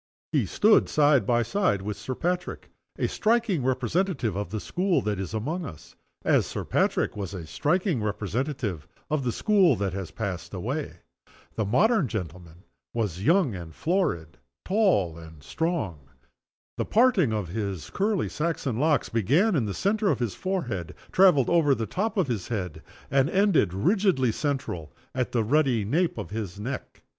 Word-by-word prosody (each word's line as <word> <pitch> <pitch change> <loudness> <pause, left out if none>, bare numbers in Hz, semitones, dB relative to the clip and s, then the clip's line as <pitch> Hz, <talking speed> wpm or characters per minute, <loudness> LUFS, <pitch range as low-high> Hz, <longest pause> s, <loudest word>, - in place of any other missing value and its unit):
He - - +1
stood 215 +1 +4
side 145 -7 +4
by 120 -1 +3
side 115 - 0
with 105 0 -3
Sir 130 - -5
Patrick 180 +4 -3 0.3
a - - +1
striking 220 - +1
representative 130 - 0
of 100 -3 -3
the 110 +3 -3
school 180 - 0
that 105 -2 -1
is 95 -3 -4
among 150 +12 -2
us 80 - -10 0.3
as - - +3
Sir - - -5
Patrick - - +1
was 100 -2 -5
a 85 -3 -6
striking 160 - 0
representative 105 - -3 0.2
of 155 -3 +1
the 125 - 0
school 190 - +3
that 100 -3 -2
has 95 -3 -4
passed 100 -6 -5
away. - - -4 0.5
The 110 - -1
modern 180 - +3
gentleman 90 -4 -7 0.3
was 100 -6 -2
young 165 - +3
and 85 -4 -8
florid, 85 - -1 0.3
tall 180 - +2
and 80 -3 -13
strong. 150 - -2 0.8
The - - 0
parting 220 - +3
of 105 -5 -2
his 100 -3 -4
curly 205 -1 0
Saxon 150 -7 -2
locks 150 0 +2
began 145 - +2
in 130 -7 +1
the 100 - -3
center 205 +1 +1
of - - +2
his 120 -6 -2
forehead, 120 - -3 0.2
traveled 180 -9 +5
over 155 -5 +4
the 115 - -2
top 215 - -2
of 190 - +3
his 115 -8 -3
head, 90 -8 -4 0.3
and 140 +1 +3
ended, 195 - +3
rigidly 145 - +2
central, 135 - -3 0.2
at 125 -2 -1
the 115 -2 +1
ruddy 125 -3 +2
nape 165 - +1
of 105 -2 -6
his 105 -3 -5
neck. 130 +5 -6
125 Hz, 165 wpm, -26 LUFS, -, 0.8 s, traveled